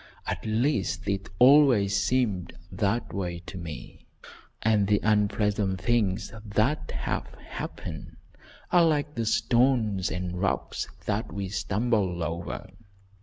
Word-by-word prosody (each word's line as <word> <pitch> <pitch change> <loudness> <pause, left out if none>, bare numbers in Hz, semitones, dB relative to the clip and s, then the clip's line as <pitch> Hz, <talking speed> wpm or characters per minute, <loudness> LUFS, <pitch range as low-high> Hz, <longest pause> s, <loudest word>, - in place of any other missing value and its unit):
At - - -3
least 110 - 0
it 100 0 -2
always 125 -7 +6
seemed 100 -3 0 0.2
that 100 +5 -1
way 90 -3 -3
to - - -9
me, 80 -8 -8 0.6
and 105 -2 +3
the 105 0 +3
unpleasant 105 -2 +1
things 105 -1 0
that 110 +8 0
have - - -3
happened 80 - -7 0.5
are 175 -1 +6
like 150 -2 +1
the 115 -4 -2
stones 115 -3 +2
and 90 0 -4
rocks 100 - -1 0.2
that 105 +1 -1
we 100 -1 -4
stumble 95 -2 0
over. 85 +3 -4
105 Hz, 120 wpm, -27 LUFS, 95-115 Hz, 0.6 s, always